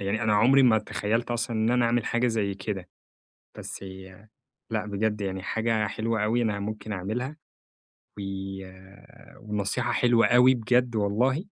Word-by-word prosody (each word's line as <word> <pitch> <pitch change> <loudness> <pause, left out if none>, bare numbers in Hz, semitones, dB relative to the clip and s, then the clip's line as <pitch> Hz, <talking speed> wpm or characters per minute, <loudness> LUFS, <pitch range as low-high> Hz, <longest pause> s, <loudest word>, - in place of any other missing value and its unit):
يعني 100 +3 -1
أنا 110 -1 +2
عمري 130 +6 +5
ما 115 -3 +5
تخيلت 110 +3 -2
أصلًا 120 0 -2
إن 110 +1 +2
أنا 125 0 +3
أعمل 115 -1 +1
حاجة 120 +1 +1
زي 110 -4 0
كده. 95 -2 -5 0.7
بس - - -7
هي 95 +2 -11 0.4
لأ، 110 -3 -1
بجد 105 +1 -1
يعني 95 -1 -3
حاجة 115 +1 0
حلوة 110 +1 -1
أوي 115 +3 +1
أنا 105 -3 -1
ممكن 105 +1 -5
أعملها. 110 +9 -3 0.8
و - - -4 1.2
ونصيحة 105 +1 -2
حلوة 120 -1 +4
أوي 125 +2 +6
بجد 125 0 +1
والله. 120 - +1
110 Hz, 150 wpm, -26 LUFS, 100-120 Hz, 1.2 s, أوي